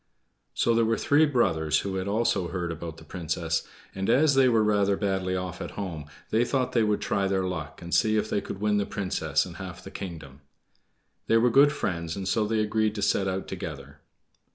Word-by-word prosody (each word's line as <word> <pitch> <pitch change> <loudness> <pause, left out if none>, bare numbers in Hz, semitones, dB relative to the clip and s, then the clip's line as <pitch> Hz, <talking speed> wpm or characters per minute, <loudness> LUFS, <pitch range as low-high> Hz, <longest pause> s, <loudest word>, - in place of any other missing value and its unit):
So 115 - +2
there 115 0 +3
were 115 0 +1
three 150 +7 +4
brothers 80 - +1
who 95 -1 -3
had 95 +1 -3
also 100 -3 +1
heard 85 -1 -3
about 80 0 -7
the 80 - -13
Princess, 80 -1 -2 0.3
and 95 +2 -3
as 140 +5 +4
they 135 -1 +5
were 115 -2 +3
rather 100 -2 +2
badly 95 -2 -1
off 90 -1 -4
at - - -7
home, 85 -7 -4 0.3
they 115 +2 +3
thought 130 0 0
they 115 - +2
would 105 -1 +1
try 100 -1 0
their 95 -1 0
luck 80 -4 -5
and 85 - -6
see 110 -2 +3
if 105 0 0
they 105 - -1
could 95 - -7
win 105 0 +1
the 100 - 0
Princess 80 -6 -1
and 85 -2 -10
half 95 -1 -8
the 95 - -10
kingdom. 80 -8 -8 0.9
They 115 - +4
were 120 +1 +3
good 140 +4 +6
friends, 85 - -3
and 95 -1 -4
so 105 +2 +1
they 110 0 +1
agreed 110 0 0
to 100 - -2
set 95 -1 +2
out 95 0 -3
together. 75 -5 -7
95 Hz, 215 wpm, -27 LUFS, 85-110 Hz, 0.9 s, good